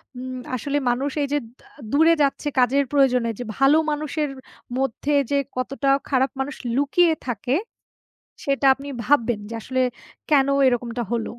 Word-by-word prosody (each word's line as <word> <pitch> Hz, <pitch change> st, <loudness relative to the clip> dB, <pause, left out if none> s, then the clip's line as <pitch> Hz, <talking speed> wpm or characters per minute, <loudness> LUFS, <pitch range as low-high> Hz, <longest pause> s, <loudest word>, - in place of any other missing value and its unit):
হুম, 255 Hz, 0 st, -6 dB, 0.2 s
আসলে 285 Hz, +4 st, -2 dB
মানুষ 265 Hz, +4 st, 0 dB
এই -, -, -1 dB
যে -, -, +3 dB, 0.2 s
দ্য -, -, -22 dB, 0.3 s
দূরে 325 Hz, +3 st, +5 dB
যাচ্ছে 280 Hz, +1 st, 0 dB
কাজের 270 Hz, +3 st, +3 dB
প্রয়োজনে 250 Hz, -4 st, +3 dB
যে, -, -, -3 dB
ভালো 270 Hz, +3 st, +5 dB
মানুষের 300 Hz, 0 st, -2 dB, 0.5 s
মধ্যে 270 Hz, +2 st, -1 dB, 0.2 s
যে 280 Hz, -, +3 dB, 0.2 s
কতটা 275 Hz, +2 st, -1 dB, 0.2 s
খারাপ 265 Hz, 0 st, +2 dB
মানুষ 270 Hz, +1 st, -3 dB, 0.2 s
লুকিয়ে 320 Hz, +5 st, +3 dB
থাকে, 245 Hz, +3 st, -1 dB, 0.9 s
সেটা 275 Hz, 0 st, 0 dB
আপনি 275 Hz, +2 st, -10 dB, 0.2 s
ভাববেন। 240 Hz, -5 st, +2 dB
যে -, -, -6 dB
আসলে 260 Hz, +2 st, -1 dB, 0.5 s
কেন 275 Hz, -2 st, +5 dB, 0.2 s
এরকমটা 240 Hz, -1 st, -1 dB
হল? 230 Hz, -1 st, -1 dB
270 Hz, 150 wpm, -23 LUFS, 250-285 Hz, 0.9 s, দূরে